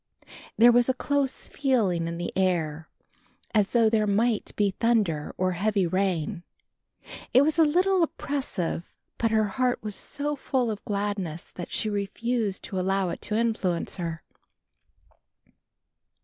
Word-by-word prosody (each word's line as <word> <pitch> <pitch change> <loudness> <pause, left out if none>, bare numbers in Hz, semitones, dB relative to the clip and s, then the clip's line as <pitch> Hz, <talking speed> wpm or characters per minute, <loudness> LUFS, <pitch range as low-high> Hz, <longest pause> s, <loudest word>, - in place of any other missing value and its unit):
There 235 +2 +8
was 245 +1 +4
a 260 - +2
close 280 0 -1
feeling 210 -12 +1
in 170 0 -4
the 175 - -4
air, 160 -5 0 0.6
as 210 -3 +2
though 230 -2 +4
there 215 -1 +2
might 215 +2 +1
be 205 -2 +2
thunder 200 -8 0
or 185 0 +1
heavy 195 +2 +1
rain. 175 -2 -1 0.9
It 260 - +8
was 310 +3 +1
a - - +8
little 365 +5 +3
oppressive 270 - -2 0.3
but 230 - +2
her 220 0 +3
heart 250 +3 0
was 210 -1 -3
so 290 +7 -3
full 260 -4 -1
of 210 - -6
gladness 200 -5 -3
that 175 - -8
she - - -1
refused 210 +1 -2
to 190 - -4
allow 190 0 +1
it - - -5
to 210 - -2
influence 210 -8 -1
her. 165 -3 -4
210 Hz, 145 wpm, -26 LUFS, 185-245 Hz, 0.9 s, There